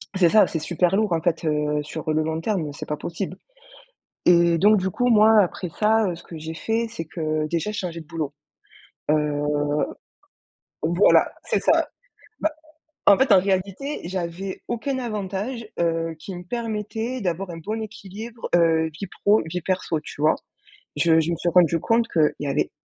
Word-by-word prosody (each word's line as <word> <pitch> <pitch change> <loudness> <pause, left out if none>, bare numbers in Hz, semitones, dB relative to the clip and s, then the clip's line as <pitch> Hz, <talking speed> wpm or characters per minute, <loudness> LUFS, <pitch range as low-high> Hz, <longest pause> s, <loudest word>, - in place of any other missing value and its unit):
C'est 180 -3 +5
ça, 215 +3 +6
c'est 165 - -3
super 175 +3 +1
lourd 215 -4 +1
en 165 - +1
fait, 165 -1 0
heu, 150 -1 0
sur 155 +1 -4
le 155 0 +2
long 160 +1 -2
terme, 165 -6 -1
c'est - - -8
pas 150 - -2
possible 180 +4 -5 0.9
et 170 -1 +5
donc 210 +5 +6
du 190 -1 0
coup 245 +7 0
moi 220 -1 +6
après 180 -2 -1
ça, 215 +3 +2
heu, - - -3
ce 170 - -12
que 165 - -10
j'ai 160 +1 -6
fait, 225 +7 -1
c'est 165 -8 -6
que 155 -1 -2
déjà 170 +5 -1
j'ai 215 - -5
changé 170 -2 -4
de - - -22
boulot. 160 -3 -4 0.8
Heu, 150 -1 +1 1.4
voilà, 170 +5 +4
c'est - - 0
ça. - - +3 0.5
Bah 315 - +1 0.5
en 200 - +7
fait 265 0 +2
en 190 - +8
réalité, 195 +9 -2
j'avais 185 +1 -4
aucun 260 +3 -2
avantage, 215 +1 -4
heu, 165 -1 0
qui 190 - -7
me 175 0 -7
permettait 225 +2 -3
d'avoir 185 -2 -2
un 170 - -6
bon 215 +7 -4
équilibre, 220 +2 -8
heu, 165 -2 +4
vie 180 +6 -6 0.2
pro, 210 +2 +5
vie 170 +2 -3
perso, 180 -3 -1
tu 145 - -9
vois? 155 +1 +4 0.6
Je 165 -1 +4
je 160 +1 0
me - - 0
suis 175 +1 -1
rendu 170 -1 +4
compte 230 0 +2
qu'il 155 -7 +2
y 145 - -3
avait 140 - 0
180 Hz, 185 wpm, -23 LUFS, 160-210 Hz, 1.4 s, en